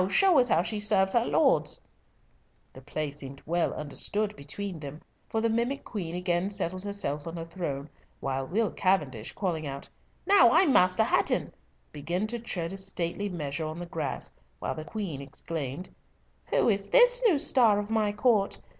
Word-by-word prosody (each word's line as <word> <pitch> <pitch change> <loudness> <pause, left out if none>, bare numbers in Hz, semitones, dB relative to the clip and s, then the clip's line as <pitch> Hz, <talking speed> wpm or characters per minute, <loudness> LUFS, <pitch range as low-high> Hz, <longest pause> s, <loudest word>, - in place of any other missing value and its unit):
show 365 - +5
us 245 - +4
how 170 - +3
she 215 +2 -3
serves 195 -2 +2
her 235 - +2
lords." 150 +3 +2 0.9
The 130 - -12
play 145 +2 -4
seemed 140 -1 -9
well 170 +1 +1
understood 205 +8 -2
between 180 +4 -5
them, 150 +1 -8 0.3
for 220 - 0
the 230 - +2
mimic 235 +5 -1
queen 175 -6 -5
again 180 +1 0
settled 185 -2 -3
herself 200 -8 -3
on 165 +1 -5
her 165 - -5
throne, 155 -5 -4 0.3
while 135 0 -2
Will 215 +7 0
Cavendish, 150 - 0
calling 165 -6 -2
out, 140 0 -6 0.4
"Now 390 -12 +7
I'm 330 -2 +5
Master 185 +4 +5
Hatton," 220 - +1 0.4
began 170 +7 -2
to 235 +2 -4
tread 180 -6 -4
a - - -6
stately 195 +1 -3
measure 155 -3 -3
on 155 +1 -6
the 175 - -5
grass, 160 -5 -4 0.2
while - - -3
the 155 - -6
queen 185 -10 -4
exclaimed, 140 +3 -5 0.6
"Who - - +2
is 200 -2 +1
this - - +6
new 355 -8 +4
star 245 -8 +4
of 205 +1 -3
my 215 -2 +2
court? 210 -1 +2
185 Hz, 170 wpm, -28 LUFS, 155-215 Hz, 0.9 s, Now